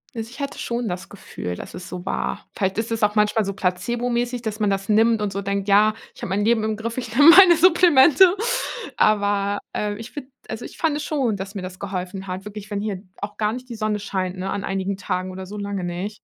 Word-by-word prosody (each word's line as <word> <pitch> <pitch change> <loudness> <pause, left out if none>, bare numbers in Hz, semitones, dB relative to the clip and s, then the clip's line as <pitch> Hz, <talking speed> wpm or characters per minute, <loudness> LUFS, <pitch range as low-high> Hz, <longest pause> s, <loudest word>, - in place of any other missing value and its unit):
Also, 225 -1 -5
ich 260 - -12
hatte 280 -1 -4
schon 235 0 -3
das 180 -1 -4
Gefühl, 90 - -6
dass - - -9
es 180 - -8
so 180 -1 -7
war. - - -3
Vielleicht 190 -1 -1
ist 230 +1 -3
es 225 -1 -1
auch 210 0 +3
manchmal 210 0 +2
so 200 - -3
placebo-mäßig, 240 +6 -1
dass 220 -2 -4
man 210 -1 +2
das 195 +1 -2
nimmt 225 +1 +4
und 205 -1 -1
so 200 +1 -3
denkt: 200 0 -2
„Ja, 210 +2 +5 0.2
ich - - -14
habe - - -3
mein 200 +2 0
Leben 225 0 +2
im 220 0 -1
Griff. 230 +2 -5
Ich 240 -2 -5
nehme 290 +5 +8
meine 350 0 +9
Supplemente.“ 345 0 +6 0.6
Aber, 205 -1 +2
äh, 210 -1 -2
ich 225 +3 -9
finde 280 -3 -8 0.2
also, 220 +2 -6
ich - - -11
fand 315 -3 +1
es 300 - -4
schon, 270 -8 0
dass 195 +1 -6
mir 200 - -5
das 185 0 -7
geholfen 190 0 -5
hat. 185 0 -5
Wirklich, 210 0 -9
wenn 200 -1 -2
hier 205 -3 -4 0.2
auch 205 +1 -5
gar 210 0 0
nicht 255 +1 -8
die 235 - -6
Sonne 215 -1 -1
scheint, 190 -2 -3
ne, 190 +1 -4
an 200 -1 -3
einigen 195 0 -2
Tagen 185 -1 -3
oder 185 0 -7
so 205 +3 -7
lange 200 -2 -3
nicht, 180 +5 -5
210 Hz, 245 wpm, -22 LUFS, 195-235 Hz, 0.6 s, meine